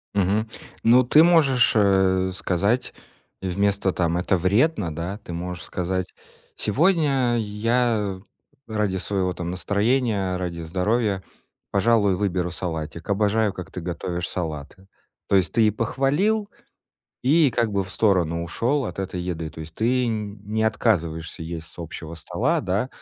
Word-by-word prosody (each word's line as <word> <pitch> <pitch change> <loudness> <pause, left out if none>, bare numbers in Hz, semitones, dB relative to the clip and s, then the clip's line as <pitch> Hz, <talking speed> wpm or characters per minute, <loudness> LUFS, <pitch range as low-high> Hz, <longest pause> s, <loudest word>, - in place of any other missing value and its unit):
Мгм. 105 +3 +1 0.3
Ну, 120 +3 +6
ты 150 +6 +6
можешь, 150 -8 +4
э, 95 -2 +3
сказать 100 +6 0 0.5
вместо 100 +1 +1
там 85 -1 0
это 90 +1 +1
вредно 100 - +1
да, 85 +5 -4
ты 85 - -7
можешь 90 +1 -5
сказать: 90 0 -3 0.4
"Сегодня 135 - +2
я 110 -2 0 0.5
ради 105 -4 -1
своего 95 -1 -1
там 85 0 -4
настроения, 100 0 0
ради 85 -2 -4
здоровья, 95 +4 0 0.5
пожалуй, 100 -1 +3
выберу 90 -2 -1
салатик. 80 -2 -5
Обожаю, 105 +1 +2
как 90 -3 -8
ты 90 - -6
готовишь 90 +1 -3
салаты". 85 +2 -5 0.4
То - - +2
есть 90 -5 +3
ты 115 -2 +4
и - - +3
похвалил, 145 - 0 0.7
и 145 +2 +4
как 115 -1 0
бы 100 -1 0
в 95 - -10
сторону 90 -6 +1
ушёл 125 +11 0
от - - -7
этой 95 -2 -3
еды. 85 -3 -4
То 80 - -10
есть 80 0 -9
ты 125 +2 +1
нь 105 -2 -3
не 110 +2 -2
отказываешься 85 -8 0
есть 80 0 -6
с - - -16
общего 80 -1 -7
стола, 80 - -1
да, 100 +7 -1
100 Hz, 145 wpm, -24 LUFS, 90-115 Hz, 0.7 s, Ну